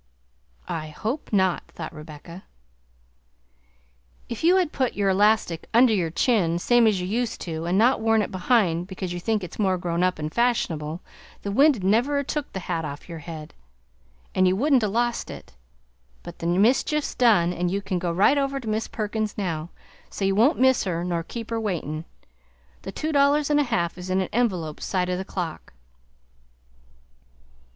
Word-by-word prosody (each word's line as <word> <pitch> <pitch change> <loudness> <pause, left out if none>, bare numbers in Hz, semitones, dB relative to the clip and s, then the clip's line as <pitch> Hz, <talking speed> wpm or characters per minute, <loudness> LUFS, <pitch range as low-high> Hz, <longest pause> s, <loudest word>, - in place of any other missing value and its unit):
"I 155 -1 -4
hope 220 - -4
not!" 190 -4 +1
thought 160 -1 -6
Rebecca. 155 +3 -11 1.8
"If 235 +3 -5
you 350 +3 +5
had 360 -5 +2
put 260 -3 -1
your 200 -1 +2
elastic 205 -4 +2
under 240 -1 +6
your 180 -5 0
chin, 175 -2 +1
same 240 +5 +4
as 205 -4 +2
you 180 - -3
used 230 +4 -2
to, 165 -1 -4
and 180 +2 +1
not 235 +3 +4
worn 225 -1 +3
it - - -5
behind 185 -4 +1
because 185 -2 -5
you 175 - -4
think 215 +2 -1
it's 180 - -9
more 190 -3 +2
grown 175 -1 -2
up 185 0 +1
an' 155 0 -4
fash'onable, 170 -9 0 0.4
the 200 - -3
wind 270 -2 +4
never'd 240 +9 +2
a' - - -1
took 295 +1 -4
the 190 - -5
hat 165 -2 -3
off 145 -1 -7
your 165 -2 -7
head, 160 -2 -9 0.8
and 185 0 +3
you 185 - +3
wouldn't 270 +4 +3
a' 215 - +1
lost 235 +3 -1
it; - - -10 0.7
but - - -10
the 165 - -3
mischief's 240 - +2
done 205 -8 +3
and 175 0 -1
you 195 +3 -1
can 190 -2 -3
go 175 -1 -1
right 200 +11 +4
over 275 0 -1
to 240 - -9
Mis' 215 +1 -1
Perkins 215 0 -3
now, 170 -5 -3 0.4
so 195 - -3
you 195 - +2
won't 235 - +4
miss 260 0 +4
her 170 -2 -2
nor 175 -1 -1
keep 230 +6 -7
her 225 0 -1
waitin'. 165 -6 -3 0.8
The 195 - -7
two 310 +9 -3
dollars 285 +1 +3
and 295 - +4
a - - +4
half 175 -6 -1
is 180 +1 -7
in 185 +1 +1
an 190 - -2
envelope 185 -10 -1
side 180 -2 -1
o' - - 0
the 185 - -3
clock." 175 - -6
195 Hz, 185 wpm, -24 LUFS, 175-235 Hz, 1.8 s, under